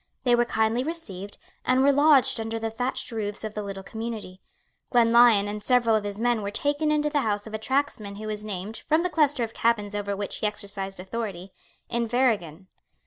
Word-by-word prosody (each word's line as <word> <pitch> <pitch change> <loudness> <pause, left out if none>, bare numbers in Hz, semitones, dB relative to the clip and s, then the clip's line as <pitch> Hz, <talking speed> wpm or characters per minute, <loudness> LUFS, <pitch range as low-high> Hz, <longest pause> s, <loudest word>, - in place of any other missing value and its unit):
They 245 -2 +3
were 240 0 +4
kindly 225 +1 +1
received, 205 - -6 0.3
and 255 +1 +3
were 280 - +6
lodged 285 -3 +5
under 225 0 -3
the 225 0 -3
thatched 245 +3 -2
roofs 210 -2 -3
of 215 -1 -4
the 210 - -3
little 195 -1 -6
community. 220 -3 -6 0.5
Glenlyon 235 -3 +5
and 210 0 -5
several 240 -2 +3
of 215 -1 0
his 205 0 -5
men 240 -1 +1
were 200 - -3
taken 290 +7 0
into 300 0 +1
the 295 - +2
house 205 -3 -1
of 220 - -10
a 220 - -2
tacksman 250 -5 -1
who 215 +2 -7
was 210 -1 -3
named, 205 +1 -5
from 315 +2 +1
the 360 - -1
cluster 290 -6 +2
of 225 -1 -4
cabins 210 -3 0
over 200 -1 -2
which 205 0 -4
he 215 - 0
exercised 200 -2 -5
authority, 190 -2 -5 0.3
Inverriggen. 225 - 0
220 Hz, 200 wpm, -26 LUFS, 205-250 Hz, 0.5 s, were